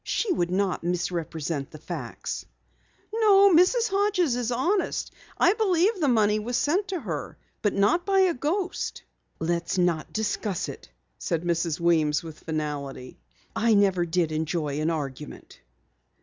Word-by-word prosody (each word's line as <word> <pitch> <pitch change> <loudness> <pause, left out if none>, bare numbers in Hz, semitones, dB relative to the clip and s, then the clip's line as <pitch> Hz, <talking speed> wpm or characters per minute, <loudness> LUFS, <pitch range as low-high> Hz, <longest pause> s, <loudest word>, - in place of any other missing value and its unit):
She 415 -6 0
would 175 - 0
not 190 0 0
misrepresent 170 -4 -2
the - - -11
facts." - - -6 0.7
"No, 400 -3 +6
Mrs. 440 +8 +4
Hodges 390 -8 +1
is 245 -1 -2
honest. 370 +11 0 0.3
I 365 - +5
believe 395 -1 +2
that 395 - -11
the 300 - +2
money 215 -4 +3
was 240 +3 -2
sent 365 +9 +1
to 370 -3 -3
her. 160 - -5 0.2
But 205 - 0
not 310 - +3
by 390 0 +3
a 370 -2 +3
ghost!" 350 +8 -2 0.3
"Let's 170 +2 -1
not 175 -3 0
discuss 210 -2 -2
it," - - -10 0.3
said 170 -2 -2
Mrs. 170 -1 -1
Weems 160 -3 +2
with 160 -2 -9
finality. 145 -5 -5 0.4
"I 225 0 +3
never 195 -3 +3
did 165 -1 0
enjoy 155 -2 -2
an 155 - +1
argument." 150 -3 -6
200 Hz, 150 wpm, -26 LUFS, -, 0.7 s, No